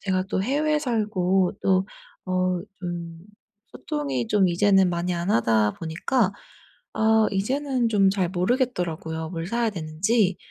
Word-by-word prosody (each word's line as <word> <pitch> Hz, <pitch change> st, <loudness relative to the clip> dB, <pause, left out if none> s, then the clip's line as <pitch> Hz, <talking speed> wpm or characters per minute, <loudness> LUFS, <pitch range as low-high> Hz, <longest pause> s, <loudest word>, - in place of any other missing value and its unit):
제가 185 Hz, -1 st, -1 dB
또 190 Hz, 0 st, -2 dB
해외에 300 Hz, +5 st, +1 dB
살고 200 Hz, -, 0 dB
또 190 Hz, 0 st, +2 dB, 0.4 s
어 185 Hz, -1 st, 0 dB, 0.2 s
좀 170 Hz, -2 st, -6 dB, 0.5 s
소통이 140 Hz, -, -3 dB
좀 195 Hz, -3 st, +3 dB
이제는 195 Hz, +1 st, +4 dB
많이 175 Hz, +1 st, -2 dB
안 175 Hz, +3 st, -2 dB
하다 110 Hz, -2 st, +2 dB
보니까 185 Hz, +7 st, -1 dB, 0.6 s
아 220 Hz, 0 st, +3 dB
이제는 255 Hz, +4 st, 0 dB
좀 195 Hz, -3 st, +4 dB
잘 190 Hz, -3 st, 0 dB
모르겠더라고요, 180 Hz, -, -1 dB
뭘 165 Hz, -2 st, -4 dB
사야 235 Hz, 0 st, 0 dB
되는지. 185 Hz, +4 st, 0 dB
185 Hz, 255 characters per minute, -24 LUFS, 170-220 Hz, 0.6 s, 이제는